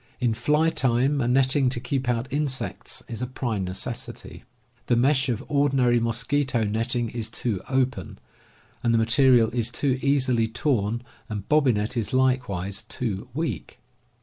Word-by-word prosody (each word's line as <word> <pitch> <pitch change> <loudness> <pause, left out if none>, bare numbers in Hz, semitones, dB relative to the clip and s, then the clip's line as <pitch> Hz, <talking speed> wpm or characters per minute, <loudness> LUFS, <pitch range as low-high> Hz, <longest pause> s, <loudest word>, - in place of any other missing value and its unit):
In 120 -3 +1
fly 150 +8 +2
time 130 +2 +1
a 120 - 0
netting 130 +1 +3
to 125 - -2
keep 130 +1 -2
out 120 +1 0
insects 145 -3 -2
is 115 0 -6
a 125 - -2
prime 120 -5 -3
necessity. 105 +6 -6 0.4
The 120 - +3
mesh 135 +2 +2
of 115 -3 -2
ordinary 135 -4 +2
mosquito 120 +2 0
netting 115 +3 -1
is 115 -2 -3
^. - - -25
too 110 -5 -2
open, 130 - -1 0.6
and 115 -1 +2
the - - +4
material 120 0 +4
is 120 -1 0
too 130 +1 -1
easily 130 -5 +2
P^^ 110 - -16
torn, 120 -4 0 0.3
and 105 -2 -5
bobbinet 125 -8 +2
is 115 +2 -2
likewise 125 -8 0
too 110 -5 -4
weak. 145 - -4
125 Hz, 155 wpm, -25 LUFS, 115-135 Hz, 0.6 s, the